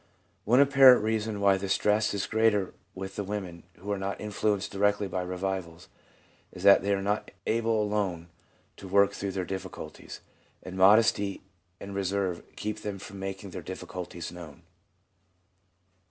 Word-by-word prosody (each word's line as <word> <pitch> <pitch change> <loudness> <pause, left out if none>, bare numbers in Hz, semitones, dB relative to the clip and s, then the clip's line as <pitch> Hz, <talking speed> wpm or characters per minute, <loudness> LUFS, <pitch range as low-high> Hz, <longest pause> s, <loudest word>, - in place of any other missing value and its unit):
One 120 +5 +4
apparent 135 -4 +7
reason 110 -1 -1
why 100 -1 +4
the 95 0 -5
stress 105 +2 +2
is 100 - -1
greater 110 -3 +1 0.2
with 95 +1 -7
the 105 - -1
women 95 -4 -5
who 100 +4 -6
are 100 - -1
not 100 +1 -3
influ 105 0 0
enced 100 0 -6
directly 105 0 +1
by 95 0 -3
revivals 90 -2 -4 0.6
is 90 - -10
that 100 0 +7
they 100 +1 -1
are 100 -1 0
not 105 +2 -1 0.2
able 115 -1 +1
alone 95 -5 -2 0.5
to 95 - -10
work 100 +1 +4
through 100 -1 -4
their 95 -1 -2
difficulties, 95 +1 -7 0.4
and 90 - -8
modesty 100 0 +4 0.4
and 100 - -8
reserve 95 -2 -1
keep 105 0 -4
them 100 -2 -4
from 95 +1 -10
making 95 0 -6
their - - -6
difficulties 90 -2 -7
known. 85 -2 -11
100 Hz, 155 wpm, -28 LUFS, 95-105 Hz, 0.6 s, apparent